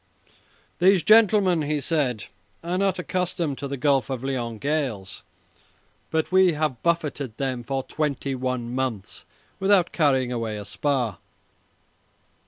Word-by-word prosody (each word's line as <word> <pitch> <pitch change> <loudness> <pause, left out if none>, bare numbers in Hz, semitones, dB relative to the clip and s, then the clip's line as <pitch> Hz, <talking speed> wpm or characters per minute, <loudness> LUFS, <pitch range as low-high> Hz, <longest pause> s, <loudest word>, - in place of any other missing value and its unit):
"These 185 0 +5
gentlemen," 205 -5 +5
he 150 0 -1
said, 135 - -1 0.4
"are 175 +2 -1
not 195 -2 +1
accustomed 180 -5 -2
to 140 - -4
the 140 0 -4
Gulf 140 -1 +2
of 130 -2 -4
Lyons 120 -4 -3
gales, 135 -10 -2 0.9
but 160 +1 -1
we 185 -2 +5
have 150 -6 -2
buffeted 150 -8 -1
them 130 -3 -2
for 135 +2 -2
twenty 140 -2 -2
one 125 -2 -3
months 125 -7 -3 0.3
without 195 -2 +3
carrying 135 -6 +2
away 115 -3 -3
a 105 - -7
spar." 125 - -1
140 Hz, 130 wpm, -24 LUFS, 125-170 Hz, 0.9 s, These